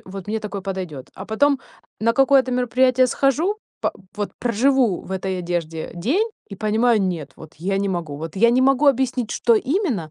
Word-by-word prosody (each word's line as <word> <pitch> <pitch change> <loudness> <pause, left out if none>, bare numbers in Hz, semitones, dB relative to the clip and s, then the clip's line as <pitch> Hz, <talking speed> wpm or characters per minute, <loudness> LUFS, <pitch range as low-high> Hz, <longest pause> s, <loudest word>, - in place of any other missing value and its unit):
э, - - -23
вот 190 -1 -8
мне 220 +1 -2
такое 205 -2 -5
подойдёт. 185 -9 -5
А 190 - -8
потом 275 +5 +2 0.4
на 230 +1 +3
какое-то 270 0 +4
мероприятие 255 +1 +3
схожу, 280 - +1 0.3
па - - 0 0.2
вот 205 -1 -2
проживу 245 -3 +2
в - - -8
этой 190 0 -2
одежде 170 -2 -3
день 285 - 0 0.2
и 200 - -8
понимаю: 220 +3 +2
нет, 165 -7 -3
вот 160 0 -13
я 195 +4 -1
не 200 0 0
могу. 170 -6 -3
Вот 160 +4 -7
я 235 +4 +5
не 250 +2 +3
могу 275 +2 +3
объяснить, 255 -3 +2
что 235 - +3
именно, 255 - -1
220 Hz, 190 wpm, -21 LUFS, 185-260 Hz, 0.4 s, я